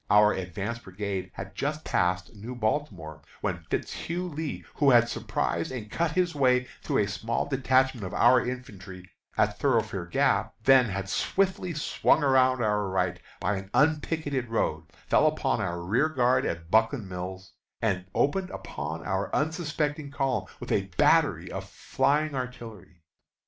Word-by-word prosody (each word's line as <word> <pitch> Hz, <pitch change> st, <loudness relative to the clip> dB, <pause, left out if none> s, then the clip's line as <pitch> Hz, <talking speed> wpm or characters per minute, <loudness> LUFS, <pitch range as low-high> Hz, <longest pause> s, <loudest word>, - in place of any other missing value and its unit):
Our 105 Hz, +1 st, +6 dB
advance 95 Hz, +5 st, -4 dB
brigade 95 Hz, -2 st, -4 dB
had 95 Hz, 0 st, -7 dB
just 150 Hz, +2 st, -3 dB
passed 90 Hz, +3 st, 0 dB
New 115 Hz, +5 st, -7 dB
Baltimore, 105 Hz, -, -2 dB, 0.2 s
when -, -, -2 dB
Fitz -, -, -2 dB
Hugh 180 Hz, +2 st, -3 dB
Lee, 155 Hz, -1 st, -5 dB
who 145 Hz, -1 st, +3 dB
had 120 Hz, -2 st, +6 dB
surprised 85 Hz, -5 st, -2 dB
and 110 Hz, -5 st, -6 dB
cut 170 Hz, -2 st, 0 dB
his 180 Hz, -1 st, +1 dB
way 125 Hz, -3 st, +3 dB, 0.2 s
through -, -, +1 dB
a -, -, -2 dB
small 110 Hz, +3 st, -2 dB
detachment 130 Hz, -3 st, +2 dB
of -, -, -8 dB
our 125 Hz, -1 st, +5 dB
infantry 95 Hz, -7 st, -7 dB, 0.3 s
at -, -, +1 dB
Thoroughfare 110 Hz, -9 st, 0 dB
Gap, 85 Hz, -, +1 dB
then 130 Hz, 0 st, +6 dB
had 95 Hz, -3 st, -3 dB
swiftly 185 Hz, -, 0 dB
swung 150 Hz, +1 st, +2 dB
around 130 Hz, -2 st, +4 dB
our 105 Hz, -1 st, +1 dB
right 90 Hz, -1 st, -1 dB, 0.2 s
by 105 Hz, -1 st, 0 dB
an 95 Hz, 0 st, -8 dB
unpicketed 150 Hz, -4 st, +1 dB
road, 115 Hz, -, -1 dB, 0.2 s
fell -, -, +4 dB
upon -, -, 0 dB
our 85 Hz, 0 st, -2 dB
rearguard 130 Hz, -, +2 dB
at 85 Hz, 0 st, -5 dB
Buckland 110 Hz, 0 st, +2 dB
Mills, 95 Hz, +1 st, -7 dB, 0.3 s
and 95 Hz, -5 st, 0 dB
opened 185 Hz, +6 st, +1 dB
upon 80 Hz, +3 st, -6 dB
our 95 Hz, 0 st, -1 dB
unsuspecting 150 Hz, -2 st, -1 dB
column 135 Hz, -2 st, -1 dB
with -, -, -6 dB
a -, -, +1 dB
battery -, -, +3 dB
of -, -, -6 dB
flying 150 Hz, +1 st, 0 dB
artillery. 115 Hz, -, -7 dB
120 Hz, 150 wpm, -27 LUFS, 95-140 Hz, 0.3 s, Our